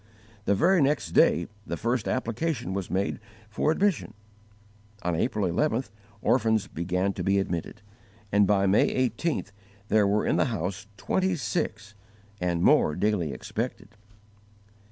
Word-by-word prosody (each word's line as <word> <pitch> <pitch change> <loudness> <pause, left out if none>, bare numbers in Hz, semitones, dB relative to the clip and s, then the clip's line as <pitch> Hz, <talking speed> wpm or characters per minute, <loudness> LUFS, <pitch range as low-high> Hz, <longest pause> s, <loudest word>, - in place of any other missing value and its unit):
The 100 - +3
very 180 - +4
next 145 +1 +1
day 85 - +4 0.2
the - - -3
first 120 -1 -1
application 125 - -2
was 95 -2 -3
made 95 +2 -1 0.3
for 110 - 0
admission; 160 - 0 0.9
on 90 - 0
April 105 +1 0
11th 120 - 0 0.3
orphans 110 -4 +2
began 90 +3 -1
to 90 - -4
be 100 +2 +2
admitted; 95 +2 -3 0.5
and 100 -1 +4
by 100 -1 +3
May 110 +6 +3
18th 140 -1 -3 0.4
there 105 -1 +4
were 105 +1 +1
in - - +1
the - - +3
house 95 -4 -3
twenty 190 -1 0
six, 105 -4 -3 0.5
and 85 -1 0
more 75 - +4
daily 95 -6 0
expected. 110 - -5
105 Hz, 135 wpm, -27 LUFS, 95-125 Hz, 0.9 s, very